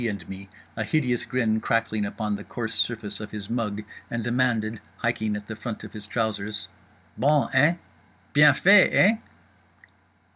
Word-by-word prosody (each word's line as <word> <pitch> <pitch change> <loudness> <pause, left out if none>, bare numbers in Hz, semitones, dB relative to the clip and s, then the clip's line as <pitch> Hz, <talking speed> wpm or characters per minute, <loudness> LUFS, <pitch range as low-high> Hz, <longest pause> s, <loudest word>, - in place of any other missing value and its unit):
and 100 -5 -5
me, 95 0 -9 0.3
a 110 - -2
hideous 125 -1 0
grin 115 -4 0
crackling 110 -2 0
upon 105 0 -3
the 100 - -7
coarse 110 -1 -5
surface 105 -4 -1
of 105 -1 -7
his 105 -1 -7
mug, 105 -3 -2 0.3
and 120 -1 -3
demanded—hiking 115 -2 -1
at 105 0 -6
the 110 - -6
front 110 0 -6
of - - -10
his 105 -1 -8
trousers— 105 -2 -2 0.5
"_Bon, 145 +1 +3
eh? 145 +6 +5 0.6
Bien 145 -1 +7
fait, 195 +4 +7
eh? 215 +4 +5
110 Hz, 150 wpm, -25 LUFS, 105-125 Hz, 0.6 s, Bien